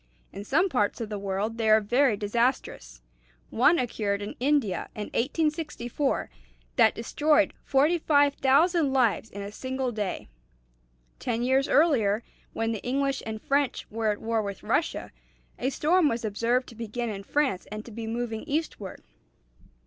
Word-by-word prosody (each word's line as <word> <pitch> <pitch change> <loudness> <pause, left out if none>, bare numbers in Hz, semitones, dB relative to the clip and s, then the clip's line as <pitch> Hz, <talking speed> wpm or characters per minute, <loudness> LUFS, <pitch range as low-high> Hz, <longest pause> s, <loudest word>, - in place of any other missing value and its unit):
In 200 - -6
some 310 - +2
parts 250 - 0
of 225 -2 -4
the 210 -1 -4
world 200 +3 -3
they 220 -1 +1
are 215 0 +7
very 240 +2 +2
disastrous. 205 - -1 0.5
One 285 +9 +4
occurred 205 -5 -1
in 205 - -5
India 265 -7 +1
in 210 -1 -5
1864 295 - -1 0.4
that - - +5
destroyed 300 +6 +2
45,000 290 +1 +3
lives 230 -5 +1
in 200 0 -7
a 200 - -6
single 260 +2 -3
day. 210 -4 -4 0.9
Ten 235 -1 -2
years 265 +2 +2
earlier, 235 -9 +3 0.3
when 225 0 -1
the 220 - -4
English 275 +2 -1
and 220 0 -4
French 280 +2 0
were 220 0 0
at 210 - -1
war 225 0 0
with 200 -2 -6
Russia, - - -1 0.5
a 260 - 0
storm 315 +3 +3
was 230 0 -2
observed 230 +4 0
to 230 - -13
begin 230 +1 -4
in 195 -1 -6
France 260 -3 -1
and 215 +1 -6
to 235 - -10
be 225 +1 -6
moving 225 -1 -3
eastward. 285 - -4
235 Hz, 150 wpm, -27 LUFS, 215-280 Hz, 0.9 s, are